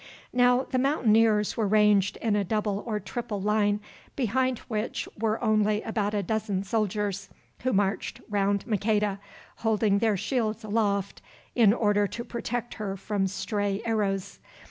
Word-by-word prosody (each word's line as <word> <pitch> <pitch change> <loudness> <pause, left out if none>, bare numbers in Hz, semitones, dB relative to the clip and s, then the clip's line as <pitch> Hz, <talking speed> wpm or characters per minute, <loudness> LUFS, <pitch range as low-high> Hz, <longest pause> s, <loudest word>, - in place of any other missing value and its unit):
Now 245 +1 +4
the 255 - -1
Mountaineers 225 -6 +3
were 220 -3 0
ranged 210 -2 +3
in 220 -3 +2
a 205 - +2
double 205 0 -1
or 215 -2 -1
triple 205 +2 -4
line, 205 0 +2 0.4
behind 255 0 +1
which 215 0 -3
were 220 0 0
only 215 -1 +2
about 210 -2 -1
a 205 - 0
dozen 210 -1 -1
soldiers, 205 -1 -1 0.3
who 255 - 0
marched 195 -2 0
round 200 -1 0
Maqueda, 210 -2 0 0.4
holding 215 -2 +2
their 220 -2 +2
shields 220 +1 -1
aloft 205 -2 -1 0.3
in 225 -5 +5
order 205 -2 +2
to 235 - -6
protect 240 0 -4
her 195 -2 -4
from 195 0 -1
stray 205 +1 -2
arrows. 200 -4 -1
210 Hz, 145 wpm, -27 LUFS, 200-225 Hz, 0.4 s, in